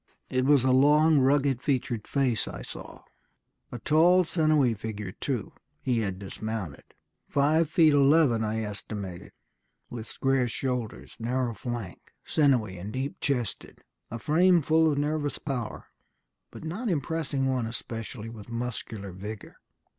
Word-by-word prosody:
It 130 0 +1
was 140 -2 +5
a 130 - +3
long, 150 +3 +5
rugged 135 -1 +2
featured 125 -6 -1
face 130 -5 +1
I - - -7
saw. - - -10 0.7
A 120 - -5
tall, 170 +8 +4
sinewy 155 -7 +2
figure, 105 -2 -5
too 125 +2 -4 0.3
(he 125 -3 0
had 95 -4 -2
dismounted), 100 -4 -5 0.4
five 150 +3 +2
feet 160 -2 +5
eleven, 140 -4 +4
I 110 +1 -1
estimated, 100 -3 -6 0.6
with 115 -2 -6
square 135 -2 +1
shoulders, 125 -2 -4
narrow 120 +1 -1
flank, 115 -3 -6
sinewy 125 - +2
and 100 +4 -6
deep 135 +4 -4
chested. 125 -6 -3 0.3
A 115 - -5
frame 170 +6 +4
full 160 +2 +4
of 145 - -1
nervous 145 0 -1
power, 125 -6 -5 0.6
but - - -11
not 195 +9 -3
impressing 150 -3 -1
one 130 -3 0
especially 115 -1 -6
with 115 -1 -10
muscular 115 -4 -5
vigor. 100 +3 -8
130 Hz, 135 wpm, -28 LUFS, 110-145 Hz, 0.7 s, was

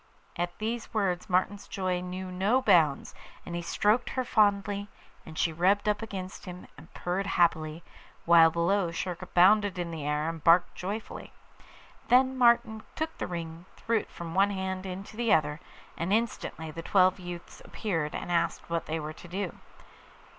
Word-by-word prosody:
At 175 0 -3
these 225 +1 -4
words 185 -4 0
Martin's 190 +3 0
joy 185 -2 -2
knew 185 +1 -6
no 195 +8 +2
bounds, 170 - +3 0.3
and 170 - -7
he 175 - -2
stroked 210 +7 +1
her 260 - -1
fondly, 205 -2 +2 0.4
and 160 -1 -10
she 165 - +1
rubbed 195 +6 +2
up 210 0 +1
against 190 -4 -7
him 180 0 -8
and 165 - -15
purred 185 +3 -2
happily, 165 -3 +1 0.4
while 165 -1 +7
below 170 +3 +1
Schurka 175 +1 -4
bounded 195 +2 +4
in 175 -1 -3
the 160 -3 -5
air, 150 +1 -1
and 165 -2 -5
barked 175 +2 +5
joyfully. 205 +4 -6 0.7
Then 260 +1 +4
Martin 235 -3 +3
took 320 +1 -3
the - - -2
ring, 170 -2 -4 0.2
and - - -28
threw 230 -1 +1
it - - -10
from 170 -1 -8
one 195 +2 +4
hand 190 -1 -3
into 195 +3 -7
the 230 -1 0
other, 150 -1 +2 0.4
and 170 +3 -3
instantly 210 -7 -1
the 165 - -7
twelve 185 +2 +3
youths 175 -1 -9
appeared 165 -8 -3
and - - -5
asked 170 -1 -1
what 170 -1 -1
they 160 +1 -2
were 155 0 -5
to 175 - -13
do. 185 +1 -4
185 Hz, 175 wpm, -29 LUFS, 170-205 Hz, 0.7 s, while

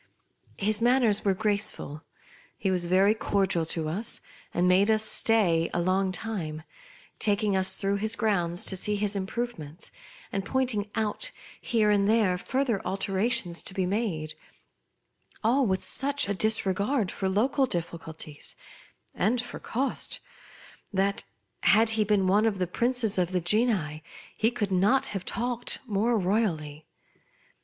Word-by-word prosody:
His 215 +2 0
manners 235 -4 +3
were 195 -2 +2
grace 205 +1 +1
ful. 150 +2 -7 0.6
He 195 - -1
was 180 -2 0
very 190 +4 +4
cordial 195 -6 0
to 160 -1 -2
us, 200 +9 -2 0.3
and 180 +1 +1
made 190 +3 +4
us 215 0 +3
stay 190 -8 +3
a - - +1
long 185 +2 +1
time, 175 -7 -4 0.6
taking 205 -1 +1
us 190 0 +2
through 200 0 0
his 220 +3 0
grounds 175 -6 +1
to 190 - +2
see 210 +3 +1
his 205 0 -1
improvements, 190 -6 -5 0.4
and 195 - -2
point 260 +3 0
ing 205 -1 -3
out 220 - 0 0.3
here 215 -3 +2
and 200 0 +2
there 215 -5 +3
further 255 -3 -1
alterations 195 -2 0
to 185 - -6
be 190 - 0
made, 180 -6 -2 1.1
all 250 +3 +3
with 190 -1 -1
such 285 -2 +3
a 200 - 0
disregard 205 +2 +1
for 190 - -2
local 260 +7 +2
difficulties, 160 -4 -5 0.6
and 225 +6 +1
for 245 +1 -5
cost, 265 +4 -2 0.7
that, 195 0 0 0.4
had 220 +4 +4
he 220 -1 +2
been 205 -2 +2
one 205 +4 +3
of 210 -3 -1
the 185 - 0
princes 235 +2 0
of 180 0 0
the 180 - +2
genii 180 -5 +1 0.3
he 225 - +2
could 220 -5 -3
not 205 +9 +3
have 195 -3 -3
talked 245 0 -1
more 225 +1 +1
royally. 175 -7 -1
200 Hz, 150 wpm, -27 LUFS, 185-225 Hz, 1.1 s, very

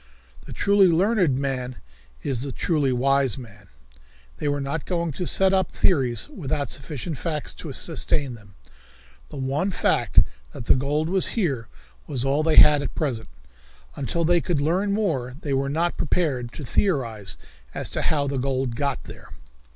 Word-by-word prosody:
The - - -9
truly 200 -1 +4
learned 180 - +3
man 130 -2 -2 0.5
is 130 -4 -1
the 140 0 -2
truly 145 0 0
wise 135 0 +2
man. 105 -6 -12 0.7
They - - -3
were 145 0 0
not 140 +3 -3
going 170 -2 -1
to 175 +5 -4
set 190 0 +3
up 190 -1 +2
theories 125 - +1
without 145 - -3
sufficient 145 +1 -5
facts 155 -4 -2
to 155 - -7
sustain 145 -2 -1
them. 105 -4 -15 0.7
The - - -10
one 135 +8 0
fact 190 - 0 0.4
that - - -7
the - - +6
gold 145 +4 0
was 190 +5 +1
here 140 - 0 0.4
was 135 -3 -2
all 140 +3 +2
they 155 0 +2
had 150 -1 +8
at 145 - -5
present. 125 -8 -2 0.7
Until 165 +5 -1
they 175 +1 +4
could 170 -4 0
learn 180 +8 +1
more 155 - -1
they 145 -4 -3
were 135 +1 0
not 165 +4 0
prepared 140 -8 0
to 150 - -7
theorize 115 - -1 0.4
as - - -3
to - - -1
how 145 -3 +1
the 140 -1 -1
gold 130 -2 -1
got 140 0 -2
there. - - -12
140 Hz, 165 wpm, -24 LUFS, 130-170 Hz, 0.7 s, had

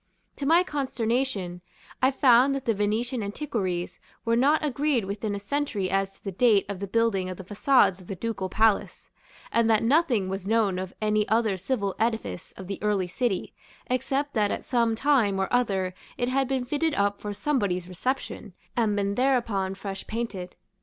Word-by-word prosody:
To 275 - -3
my 335 +4 +6
consternation, 240 - -2 0.4
I 260 - +5
found 265 0 +5
that 275 - -4
the 230 - +2
Venetian 220 +4 -1
antiquaries 200 -6 -3 0.3
were 230 0 +2
not 290 +6 +3
agreed 280 -5 +1
within 205 +1 -3
a - - -4
century 205 -5 -2
as 195 0 0
to - - -27
the 195 - -3
date 210 0 +4
of 200 -2 -5
the 200 - -4
building 200 -3 +1
of 185 - -6
the 190 - -8
façades 205 -1 +3
of 180 - -15
the 195 - -4
Ducal 195 -1 -3
Palace, 220 +1 +1 0.4
and 230 -1 +3
that 220 -1 +3
nothing 245 - +3
was 190 0 -4
known 210 -4 +2
of 185 0 -5
any 210 0 +2
other 220 -2 +2
civil 200 0 -2
edifice 225 - -2
of 190 - -9
the 195 +1 -6
early 205 -3 +1
city, 190 +2 -2 0.4
except 275 +3 0
that 210 -3 +2
at - - -3
some 235 -3 +2
time 230 -7 +2
or 190 - +1
other 195 -7 +1 0.2
it 245 - 0
had 270 +1 +1
been 260 -1 -1
fitted 300 +3 0
up 200 -2 0
for 210 - -4
somebody's 205 -6 -1
reception, 205 +1 -3 0.2
and 220 -4 +2
been 200 0 0
thereupon 230 -6 +1
fresh 195 0 -6
painted. 215 -6 -4
220 Hz, 180 wpm, -26 LUFS, 195-255 Hz, 0.4 s, my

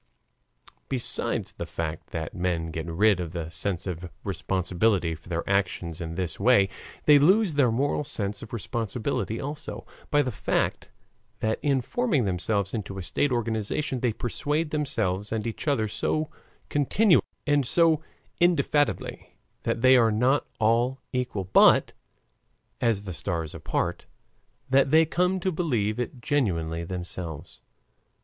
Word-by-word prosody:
Besides 130 -3 -1
the - - -7
fact 80 -1 -4
that 80 -2 -5
men 85 -2 -1
get 80 0 -4
rid 95 +4 +3
of 85 -2 -4
the 85 -2 -4
sense 85 +2 -2
of 90 -1 -5
responsibility 95 -1 0
for 80 +2 -12
their 85 -1 -2
actions 90 -3 -1
in 80 -1 -5
this 90 -2 -3
way, 100 -3 +5 0.4
they 145 -1 +8
lose 190 +4 +4
their 140 -4 +4
moral 140 +5 0
sense 105 -8 -3
of 115 - -10
responsibility 115 +1 -2
also, 145 +2 -6 0.2
by 145 0 +3
the 130 - -2
fact 105 - -1 0.5
that 110 0 0
in 140 -3 +2
forming 170 - 0
themselves 100 +2 0
into 100 -3 -4
a 95 - -4
state 145 +9 0
organization 120 +4 -1
they 120 -1 +1
persuade 150 +8 -2
themselves 105 -10 0
and 110 0 -2
each 115 +6 -5
other 115 -7 +2
so 155 +8 -1 0.4
continually, 170 +7 +3 0.2
and 145 -3 +2
so 165 0 +4 0.4
indefatigably, 150 -4 +1 0.2
that 115 - -1
they 130 0 +8
are 115 -3 +5
not 125 +6 +2
all 120 +4 +2
equal, 125 -6 -1
but 95 - +5 0.9
"as 115 -4 +1
the 95 -3 -6
stars 80 +1 -3
apart," - - -2 0.6
that 135 +1 +4
they 160 +3 +6
come 180 +4 +1
to 185 +1 0
believe 120 - 0
it 125 +1 -4
genuinely 85 - 0
themselves. 85 -3 -6
115 Hz, 140 wpm, -26 LUFS, 90-140 Hz, 0.9 s, they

